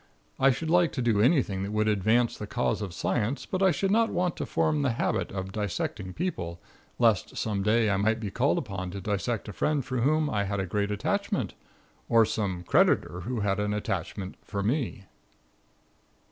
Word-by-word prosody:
I 135 Hz, -, +6 dB
should 160 Hz, +5 st, -1 dB
like 175 Hz, -1 st, +4 dB
to 130 Hz, -, -2 dB
do 110 Hz, -4 st, +3 dB
anything 120 Hz, -, +2 dB
that 100 Hz, -, -3 dB
would 110 Hz, 0 st, +1 dB
advance 110 Hz, +4 st, +2 dB
the 105 Hz, -, -6 dB
cause -, -, -1 dB
of 100 Hz, -3 st, -4 dB
science, 115 Hz, +8 st, -1 dB
but 185 Hz, -, -3 dB
I 190 Hz, -, +6 dB
should 190 Hz, +4 st, 0 dB
not 225 Hz, +2 st, +3 dB
want 180 Hz, -1 st, 0 dB
to -, -, -3 dB
form 155 Hz, -2 st, +1 dB
the 135 Hz, -4 st, +1 dB
habit -, -, -1 dB
of 95 Hz, 0 st, -4 dB
dissecting 100 Hz, -2 st, -3 dB
people, 85 Hz, -, -3 dB, 0.4 s
lest 115 Hz, -5 st, +2 dB
some 105 Hz, -3 st, -1 dB
day 110 Hz, +3 st, +3 dB
I 100 Hz, -2 st, +2 dB
might 110 Hz, +3 st, +1 dB
be 105 Hz, -3 st, -4 dB
called 125 Hz, +7 st, +2 dB
upon 95 Hz, -4 st, -4 dB
to 100 Hz, +2 st, -6 dB
dissect 105 Hz, +3 st, -2 dB
a 105 Hz, -, -6 dB
friend 145 Hz, +5 st, 0 dB
for 130 Hz, -, -3 dB
whom 155 Hz, +4 st, +2 dB
I 105 Hz, -7 st, 0 dB
had 100 Hz, 0 st, -2 dB
a 95 Hz, -, -1 dB
great 100 Hz, +3 st, -1 dB
attachment, 105 Hz, 0 st, -1 dB, 0.6 s
or 115 Hz, -1 st, +6 dB
some 95 Hz, -5 st, -2 dB
creditor 90 Hz, 0 st, +2 dB
who 120 Hz, -2 st, -2 dB
had 100 Hz, -1 st, 0 dB
an 105 Hz, 0 st, 0 dB
attachment 95 Hz, -1 st, -4 dB
for 100 Hz, -2 st, -3 dB
me. 120 Hz, -2 st, -1 dB
110 Hz, 195 wpm, -28 LUFS, 100-130 Hz, 0.6 s, I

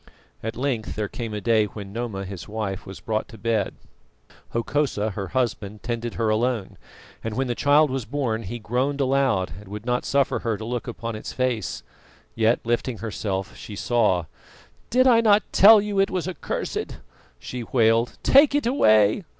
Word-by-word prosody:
At 115 Hz, +1 st, -4 dB
length 125 Hz, -4 st, -2 dB
there 105 Hz, -1 st, -2 dB
came 115 Hz, +2 st, -6 dB
a 105 Hz, -, -3 dB
day 110 Hz, -1 st, +3 dB
when 100 Hz, -1 st, -9 dB
Noma, 110 Hz, -4 st, -4 dB
his 95 Hz, -2 st, -8 dB
wife, 105 Hz, -3 st, -4 dB
was 95 Hz, -, -8 dB
brought 110 Hz, -1 st, -2 dB
to 115 Hz, -, -12 dB
bed. 110 Hz, -3 st, -1 dB, 0.7 s
Hokosa, 115 Hz, -3 st, -1 dB
her 100 Hz, 0 st, -5 dB
husband, 110 Hz, -5 st, -2 dB
tended 120 Hz, -1 st, -3 dB
her 115 Hz, -2 st, 0 dB
alone, 110 Hz, -2 st, -1 dB, 0.4 s
and 115 Hz, -1 st, -3 dB
when 135 Hz, -, +1 dB
the 120 Hz, -, -1 dB
child 145 Hz, +3 st, +4 dB
was 130 Hz, -3 st, -2 dB
born 120 Hz, -3 st, -2 dB
he 115 Hz, +3 st, -5 dB
groaned 125 Hz, +6 st, -1 dB
aloud 130 Hz, -, +1 dB
and 105 Hz, -, -14 dB
would 105 Hz, +3 st, -7 dB
not 125 Hz, 0 st, 0 dB
suffer 140 Hz, -1 st, +1 dB
her 115 Hz, -3 st, -2 dB
to 110 Hz, -, -7 dB
look 120 Hz, +1 st, -3 dB
upon 115 Hz, -1 st, -5 dB
its 110 Hz, -, -7 dB
face. 125 Hz, -4 st, -2 dB, 0.5 s
Yet, 115 Hz, +1 st, +2 dB
lifting 120 Hz, +1 st, -1 dB
herself, 100 Hz, -3 st, -4 dB
she 105 Hz, -, -9 dB
saw. 100 Hz, -6 st, +1 dB, 0.6 s
"Did 255 Hz, +3 st, +4 dB
I 235 Hz, -3 st, +6 dB
not 210 Hz, -2 st, +5 dB
tell 215 Hz, +2 st, +8 dB
you 205 Hz, -1 st, -1 dB
it 195 Hz, -, +3 dB
was 180 Hz, -2 st, -2 dB
accursed?" 185 Hz, -, -4 dB, 0.4 s
she 125 Hz, -, -6 dB
wailed. 115 Hz, 0 st, +2 dB
"Take 280 Hz, +1 st, +6 dB
it 290 Hz, -, +1 dB
away!" 110 Hz, -, +4 dB
115 Hz, 175 wpm, -24 LUFS, 105-135 Hz, 0.7 s, tell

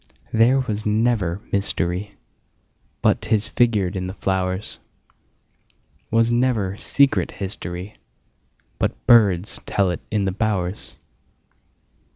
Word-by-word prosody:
There 120 Hz, +4 st, +4 dB
was 110 Hz, -4 st, -3 dB
never 105 Hz, -4 st, +1 dB
mysteryBut 100 Hz, 0 st, -1 dB, 1.1 s
'tis 110 Hz, -2 st, 0 dB
figured 110 Hz, -6 st, +1 dB
in 90 Hz, -1 st, -3 dB
the 95 Hz, -, -7 dB
flowers; 95 Hz, 0 st, -2 dB, 1.3 s
SWas 115 Hz, +1 st, +3 dB
never 120 Hz, -6 st, +1 dB
secret 140 Hz, +4 st, +2 dB
historyBut 95 Hz, 0 st, -6 dB, 1.1 s
birds 105 Hz, -6 st, +4 dB
tell 95 Hz, -3 st, +1 dB
it 90 Hz, -, -5 dB
in 105 Hz, -2 st, 0 dB
the 95 Hz, -, 0 dB
bowers. 100 Hz, -2 st, -2 dB
105 Hz, 95 wpm, -22 LUFS, 95-115 Hz, 1.3 s, There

